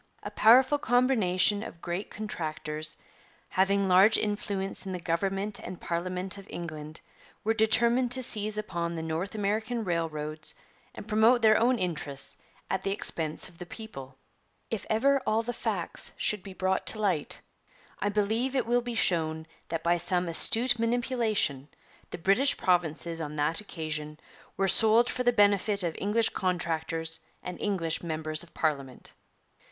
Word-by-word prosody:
'A - - -6
powerful 260 +6 +5
combination 215 -7 +2
of 170 - -8
great 175 +4 -4
contractors, 155 -6 -3 0.5
having 195 +1 +2
large 190 +4 +6
influence 205 -2 -2
in 190 - -5
the 180 - -4
Government 195 +5 -2
and 180 -1 -8
Parliament 185 +3 -3
of 195 - -13
England, 155 -2 -7 0.4
were 220 - +2
determined 235 +3 +3
to 260 +1 +2
seize 215 -2 0
upon 170 -5 -3
the 160 - -4
North 160 +6 -3
American 220 +3 -1
railroads 155 -4 -2 0.4
and 205 - -9
promote 225 +3 +4
their 215 -1 +6
own 245 +3 +3
interests 155 -7 -3 0.3
at 190 - -1
the 195 - -2
expense 160 -6 +1
of 175 -2 -18
the 175 - -6
people.' 135 - -9 0.5
'If 225 - -3
ever 275 +5 +3
all 220 +1 +2
the 245 +1 -3
facts 205 -8 -3
should 210 -2 0
be 195 0 -10
brought 190 0 -1
to 215 - -4
light, 190 -8 -1 0.6
I 205 - 0
believe 220 +6 0
it 260 - +1
will 240 +1 +2
be 240 -1 -5
shown 160 -6 +1 0.2
that 165 -1 -3
by 175 +1 +3
some 175 +1 +1
astute 230 +8 +2
manipulation 230 - +1 0.4
the - - -6
British 200 +11 +2
provinces 170 -2 0
on 150 -1 -5
that 150 +5 +1
occasion 155 -5 -5 0.4
were 195 - +2
sold 220 +5 +6
for 250 - -3
the 245 -1 +4
benefit 205 -2 +3
of 170 -2 -1
English 220 +3 +2
contractors 165 -2 -1 0.2
and 180 0 -7
English 175 -6 -1
members 155 -2 -3
of 170 - -7
Parliament.' 140 -5 -2
190 Hz, 155 wpm, -28 LUFS, 165-220 Hz, 0.6 s, large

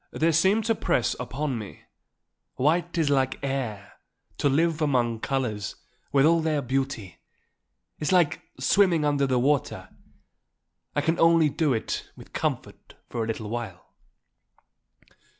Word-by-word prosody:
"They 165 +1 +1
seem 190 +7 +3
to 225 +1 +2
press 130 - 0
upon 130 +1 -3
me. 105 -3 -9 0.7
White 170 +5 +1
is 155 -3 +2
like 135 -1 +1
the - - -5
air; 120 -8 -4 0.5
to 145 - +3
live 160 +3 +1
among 120 -6 +1
colours, 110 -7 -2 0.4
with 135 +1 +4
all 165 +1 +4
their 155 -3 0
beauty, 130 -7 -3 0.8
is 150 - -1
like 175 -5 +3 0.2
swimming 170 +2 +3
under 145 -1 +2
the 130 -1 +1
water; 140 +3 0 1.1
I 145 - +2
can 165 +3 0
only 165 -2 +5
do 150 +1 0
it 110 - -3
with - - -15
comfort - - -4
for 115 - -2
a - - -4
little 110 -1 -4
while." 115 -7 -6
140 Hz, 140 wpm, -26 LUFS, 120-160 Hz, 1.1 s, only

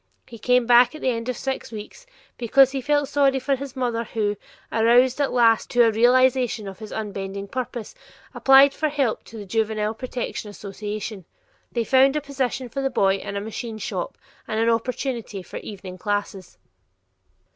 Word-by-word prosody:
He 235 -3 -12
came 250 +2 +3
back 245 +4 +5
at 310 - -9
the 260 - +1
end 230 +1 -4
of 250 - -2
six 265 -3 -4
weeks 220 - -9 0.3
because 260 +3 +4
he 270 -1 -3
felt 290 +2 +1
sorry 275 -1 +2
for 275 +1 0
his 270 0 -8
mother 240 -3 -1
who, 210 -3 -2 0.4
aroused 245 +4 +4
at 280 - +1
last 230 -2 +3
to 245 0 +4
a 225 - +4
realization 245 -1 +3
of 190 -1 -9
his 215 -1 -9
unbending 200 -2 -5
purpose, 245 -3 -5 0.4
applied 270 +1 +6
for 310 - -1
help 275 -6 -1
to 225 - -11
the 205 - -7
Juvenile 215 +1 -1
Protective 245 -2 -5
Association. 205 -1 -6 0.5
They 235 - 0
found 265 +4 +4
a 300 - 0
position 265 -2 -3
for 275 +4 -4
the 270 - 0
boy 195 -6 +2
in 200 - -6
a 200 - -2
machine 220 +1 -6
shop 190 -3 -4 0.3
and 220 - -2
an 230 +1 +3
opportunity 230 -3 -3
for - - -9
evening 185 -3 -9
classes. 205 -2 -3
235 Hz, 180 wpm, -23 LUFS, 210-260 Hz, 0.5 s, applied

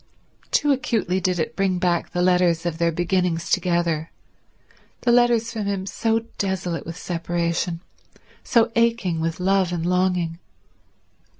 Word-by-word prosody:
Too 295 - +2
acutely 220 -8 0
did 180 -1 0
it 160 - -2
bring 195 -2 +1
back 175 -1 0
the 180 - -1
letters 180 -2 +3
of 170 -1 -2
their 170 0 +2
beginnings 175 0 -1
together, 170 -3 +1 0.9
the 240 - +2
letters 235 -1 +3
from 215 -3 -3
him 195 -2 -2
so 225 +3 0 0.2
desolate 185 -4 -2
with 165 +1 -6
separation, 170 0 -2 0.6
so 235 -1 +3
aching 230 -8 +1
with 165 +1 -2
love 190 -1 +2
and 170 -2 -2
longing. 180 -2 0
180 Hz, 135 wpm, -23 LUFS, 170-195 Hz, 0.9 s, letters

